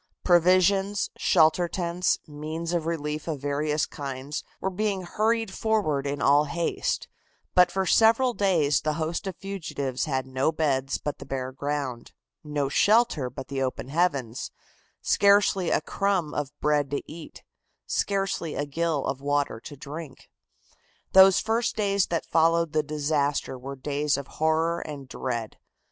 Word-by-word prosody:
Provisions, 185 +3 +3
shelter 160 +3 +3
tents, 175 +1 0
means 155 +3 -5
of 165 -2 -1
relief 150 -2 -3
of 155 -4 -3
various 145 +2 0
kinds 140 +1 -6 0.2
were 190 - -2
being 200 0 -1
hurried 220 +3 0
forward 195 -11 0
in 145 0 -3
all 145 +2 +5
haste, 170 +3 -2 0.5
but 180 -1 +5
for 190 0 0
several 230 +6 +4
days 165 -9 +2
the 155 - 0
host 165 +4 -3
of 190 - -4
fugitives 160 -10 -4
had 130 -4 -1
no 130 +3 0
beds 140 -4 0
but 150 - -5
the - - -9
bare 130 -1 -3
ground, 140 -3 -4 0.3
no 150 -2 -1
shelter 205 - +3
but 130 +2 -8
the 135 -1 -3
open 130 0 -3
heavens, 140 -7 -1 0.5
scarcely 200 -2 +4
a - - +2
crumb 190 -3 -1
of 145 -2 -2
bread 145 -2 +1
to 140 - -3
eat, 160 0 -11 0.4
scarcely 195 -5 -1
a 145 - -1
gill 155 0 -1
of 135 0 -3
water 145 -4 0
to 145 +5 -10
drink. 145 +1 -9 0.8
Those 190 0 +7
first 230 +2 0
days 200 -2 +1
that 165 -1 -2
followed 165 0 +2
the 155 - +3
disaster 145 -2 -1
were 135 +2 -7
days 145 +2 -1
of 140 - -5
horror 160 +3 0
and 145 -5 -7
dread. 120 -4 -4
155 Hz, 150 wpm, -26 LUFS, 140-180 Hz, 0.8 s, Those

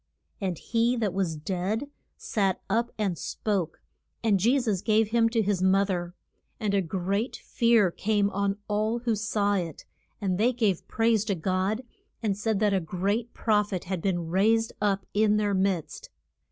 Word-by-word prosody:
And 185 -4 -1
he 235 +5 +1
that 215 -6 -1
was 185 -4 -1
dead 190 - -2 0.3
sat 195 -4 0
up 230 +4 +1
and 200 -5 0
spoke. 195 -7 -2 0.4
And 210 -4 +3
Je 240 +8 +3
sus 215 -7 -1
gave 215 0 +2
him 230 0 +3
to 225 -1 +1
his 200 -2 0
mo 190 +1 +4
ther. 175 -2 -3 0.4
And 210 -3 -1
a 200 - +3
great 195 +6 -2
fear 230 -6 +2
came 205 +1 +1
on 200 0 0
all 215 +2 0
who 235 -2 0
saw 205 -1 0
it, 175 -6 -3 0.3
and 190 -3 -1
they 240 +4 +3
gave 215 -7 0
praise 225 -2 +2
to 200 -3 0
God, 185 +7 -1 0.4
and 205 -3 +1
said 210 0 -1
that 210 -2 +3
a 195 - +3
great 200 +7 -2
proph 210 -2 +1
et 180 - -2
had 185 -1 -3
been 175 -3 -1
raised 220 +6 +2
up 200 -2 +1
in 210 0 +3
their 205 -1 +1
midst. 190 -4 -1
205 Hz, 175 wpm, -27 LUFS, 190-220 Hz, 0.4 s, mo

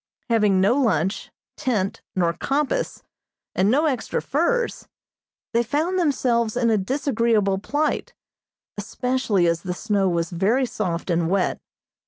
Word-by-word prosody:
Having 210 -4 +3
no 200 +8 +3
lunch, 190 - 0 0.3
tent, 210 -7 -1
nor 170 -2 +2
compass, 295 - -1 0.5
and 190 +2 +2
no 290 +7 +3
extra 260 -7 -1
furs, 470 - -1 0.7
they 235 - +3
found 305 +10 0
themselves 245 -8 +1
in 235 -2 +2
a 220 - +3
disagreeable 225 -4 +1
plight, 295 +9 -1 0.6
especially 225 -3 0
as 170 -1 +1
the 180 -2 -4
snow 200 -2 +1
was 170 -1 -1
very 210 +10 +2
soft 180 -6 -3
and 170 -1 +1
wet. 190 0 0
220 Hz, 130 wpm, -23 LUFS, 190-265 Hz, 0.7 s, Having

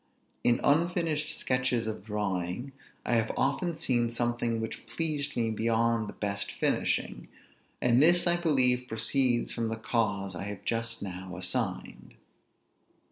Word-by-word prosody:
In 120 - +3
unfinished 160 0 +1
sketches 125 -2 0
of 110 -2 -4
drawing, 100 +2 -3 0.3
I - - 0
have 115 -1 +2
often 175 -3 0
seen 120 -6 +1
something 120 -1 -1
which 110 0 -6
pleased 150 -4 -1
me 115 -1 +1
beyond 115 0 +1
the - - -7
best 100 -1 -3
finishing; - - -1 0.6
and 125 +1 +4
this 175 +3 +6
I 175 0 +3
believe 130 -7 +3
proceeds 120 +2 +1
from 115 -1 -1
the 110 - -2
cause 105 -4 -1
I 90 +2 -5
have 100 -1 -7
just 115 -1 -2
now 95 -1 -6
assigned. 90 -1 -2
115 Hz, 135 wpm, -29 LUFS, 110-135 Hz, 0.6 s, this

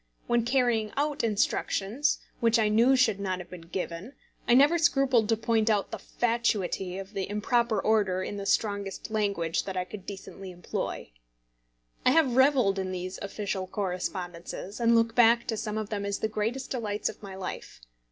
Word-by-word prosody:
When 240 -1 +2
carrying 240 -3 +1
out 290 0 0
instructions 220 +4 0 0.2
which 230 0 +3
I 215 -2 +2
knew 235 +5 +5
should 225 -6 +3
not 190 -2 -2
have 180 -1 -10
been 180 -2 -8
given, 185 +6 -5 0.3
I 240 - +5
never 295 +6 +5
scrupled 270 -9 +3
to 225 - +3
point 225 0 +1
out 205 -2 +1
the - - -5
fatuity 210 -6 -1
of 195 +2 -8
the 195 -1 -3
improper 225 +2 +1
order 200 -4 +1
in 205 - -5
the 200 0 -5
strongest 200 0 -1
language 200 -7 0
that 190 -1 -4
I 180 - -1
could 195 0 -10
decently 195 -1 -8
employ. 175 - -5 0.9
I - - +5
have 270 -3 +3
revelled 260 -7 +4
in 190 -1 -3
these 185 0 -5
official 200 -1 -3
correspondences, 185 0 -4
and 235 0 +4
look 230 0 +3
back 235 0 +5
to 225 - -2
some 215 0 -3
of 215 -1 -3
them 205 -1 -2
as 200 0 -2
the - - -1
greatest 225 +5 -3
delights 215 -5 -2
of - - -6
my 195 -2 -8
life. 190 -1 -7
210 Hz, 180 wpm, -28 LUFS, 195-235 Hz, 0.9 s, knew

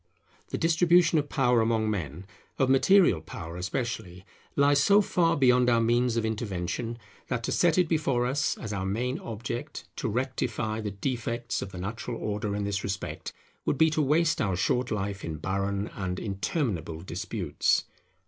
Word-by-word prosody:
The - - -2
distribution 170 0 +4
of 145 0 -3
power 125 -4 +3
among 110 -1 +1
men, 90 -4 -3 0.3
of 130 -1 +3
material 150 - +5
power 80 +1 -8
especially, 95 -1 -4 0.3
lies 140 0 +4
so 200 0 +6
far 175 -4 +2
beyond 125 -2 +4
our 115 -1 +4
means 120 +1 +2
of 115 - +1
intervention, 110 +1 -3 0.3
that - - -2
to - - -2
set 170 -1 +3
it 180 -2 +4
before 140 -7 +1
us 135 +3 0
as 110 -3 -5
our 95 -2 -2
main 120 +7 -1
object 120 +5 -5
to 125 - -1
rectify 115 -2 -2
the 105 - -3
defects 115 +3 -3
of 95 - -6
the 95 - -8
natural 110 +5 -4
order 105 -1 -2
in 105 - -2
this 100 0 -2
respect, 100 0 -4 0.3
would - - 0
be 160 +2 +5
to 155 - +1
waste 155 +3 +2
our 95 -4 +1
short 125 +7 +1
life 100 -1 -3
in 80 - -4
barren 100 +4 -2
and 90 -2 -3
interminable 95 - -2
disputes. 85 -2 0
115 Hz, 165 wpm, -28 LUFS, 100-135 Hz, 0.3 s, so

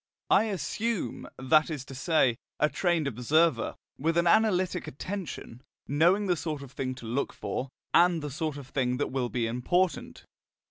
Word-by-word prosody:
I - - +6
assume, 210 - -2
that 155 +5 +3
is 145 -5 -5
to 135 - -10
say, 135 -3 +2 0.2
a 150 - +3
trained 170 +1 +1
observer, 140 +2 +2 0.2
with 165 +4 +1
an 170 - +3
analytic 185 -2 +2
attention, 160 - -6 0.3
knowing 175 +8 +3
the 180 -2 +2
sort 155 -3 -4
of 135 - -11
thing 130 -1 -3
to 125 - -10
look 125 +5 -1
for, 130 - -4 0.2
and 175 -3 +4
the 150 - -4
sort 155 0 -3
of 140 - -8
thing 125 -2 0
that 145 - -2
will 130 -2 -1
be 120 -2 -1
important. 140 +9 -1
150 Hz, 170 wpm, -28 LUFS, 130-175 Hz, 0.3 s, I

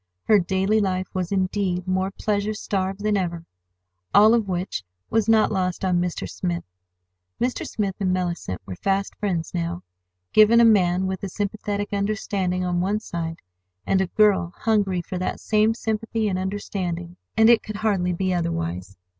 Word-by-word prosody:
Her 215 -2 +5
daily 190 +4 +1
life 185 -2 0
was, 185 -2 -2
indeed, 185 -1 0
more 185 +1 +1
pleasure 205 +1 -1
starved 195 -1 -2
than 210 -1 +2
ever—all 90 - 0
of 230 -3 +2
which 180 - -3 0.3
was 225 -1 +2
not 220 -1 +4
lost 185 -2 -1
on 180 -2 +2
Mr. 180 -1 -3
Smith. 175 -2 -3 0.8
Mr. 245 +1 -1
Smith 200 -3 -2
and 190 -2 +1
Mellicent 175 - -2
were 95 - -6
fast 195 - -1
friends 175 -6 -2
now. 85 +1 -3 0.5
Given 215 +2 +7
a 235 - +7
man 185 -4 +4
with 190 -1 -3
a 195 - -4
sympathetic 205 +1 -3
understanding 200 -3 -1
on 175 -1 0
one 200 +3 0
side, 165 -5 -5 0.4
and 190 - +2
a 190 - 0
girl 195 -3 +2
hungry 200 -5 +1
for 180 +2 -5
that 185 - -2
same 215 +1 +2
sympathy 225 -1 -2
and 185 -2 -1
understanding, 180 -3 -4 0.2
and 220 0 +6
it 235 -1 +6
could 215 - -7
hardly 200 -4 +1
be 185 +1 0
otherwise. 90 - -3
190 Hz, 165 wpm, -24 LUFS, 175-210 Hz, 0.8 s, Given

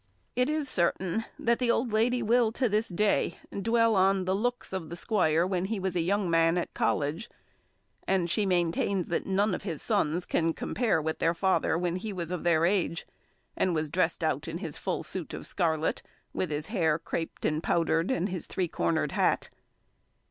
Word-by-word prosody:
It 250 +3 +2
is 305 -2 0
certain 185 +2 +1
that 235 0 +1
the 250 -2 0
old 235 -1 +1
lady 245 +3 +2
will, 230 0 +3
to 255 +1 +1
this 215 +1 +1
day, 205 +3 +1 0.2
dwell 230 +3 +2
on 190 0 +3
the 185 - +1
looks 245 +2 -2
of 175 -5 -4
the 170 - -5
squire 170 -4 +2
when 185 -1 -1
he 210 +1 -2
was 190 -1 -2
a 175 - +2
young 195 +3 +1
man 165 0 +3
at 175 - -3
college; 150 +9 -1 0.8
and 185 -3 +2
she 190 +5 +1
maintains 180 +1 0
that 170 - -1
none 195 +1 +2
of - - -3
his 170 -7 -4
sons 180 -5 0
can 165 0 +1
compare 225 -3 0
with 160 +1 -3
their 165 +1 +2
father 185 -2 +1
when 175 0 -1
he 210 +3 -5
was 175 -2 -4
of 180 - -3
their 170 -1 +3
age, 175 -3 0 0.5
and 180 -2 +1
was 155 -1 -2
dressed - - 0
out - - 0
in - - -4
his - - -5
full - - -3
suit - - -5
of - - -7
scarlet, 160 -2 0 0.3
with 185 - -2
his 150 0 -2
hair 165 -8 +1
craped 165 0 -5
and 155 +1 +1
powdered, 165 0 +1
and 200 -7 0
his 180 -2 -4
three 185 -2 -1
cornered 85 - 0
hat. - - +1
185 Hz, 195 wpm, -28 LUFS, 165-215 Hz, 0.8 s, will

